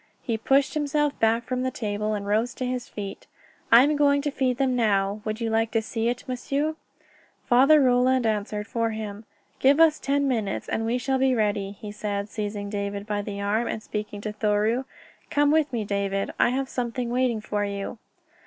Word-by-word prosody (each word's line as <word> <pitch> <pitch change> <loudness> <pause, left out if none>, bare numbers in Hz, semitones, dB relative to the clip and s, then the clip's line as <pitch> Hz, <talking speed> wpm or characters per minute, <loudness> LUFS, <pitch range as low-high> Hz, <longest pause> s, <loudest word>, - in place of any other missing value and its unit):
He 230 - -1
pushed 270 +5 +2
himself 295 -1 0
back 225 +1 +2
from 255 +1 -2
the 260 - 0
table 215 -3 -2
and 200 -1 -4
rose 220 +4 0
to 255 - -3
his 250 -1 -3
feet. 200 -2 -7 0.4
"I 235 +2 +9
am 295 +2 +2
going 285 -1 +3
to 295 - -1
feed 255 -3 0
them 260 -1 +1
now. 205 -3 +1
Would 215 +1 -3
you 230 -1 -1
like 225 0 +1
to 225 - +2
see 225 +1 -1
it, 245 0 -4
m'sieu?" 280 +5 -1 0.7
Father 275 +5 +6
Roland 255 -1 +3
answered 210 -1 -1
for 230 +1 -1
him. 215 -1 -6 0.3
"Give 275 +3 +4
us 320 -2 +5
ten 280 0 +1
minutes 220 -7 -1
and 225 0 -1
we 240 +2 +1
shall 265 +1 0
be 260 -1 +3
ready," 205 -3 0
he 205 +1 -9
said, 205 -1 -3
seizing 205 -1 -4
David 200 0 -4
by 210 -1 -2
the 200 -1 -5
arm, 215 +4 0
and 215 - -4
speaking 210 -1 -5
to 210 0 -4
Thoreau. 215 +4 +1 0.4
"Come 290 0 +3
with 305 -2 +2
me, 235 -3 -1
David. 200 -1 -1
I - - +5
have 265 +2 -1
something 240 -1 -3
waiting 250 -2 +1
for 210 -1 -2
you." 200 +2 -4
230 Hz, 200 wpm, -25 LUFS, 210-260 Hz, 0.7 s, I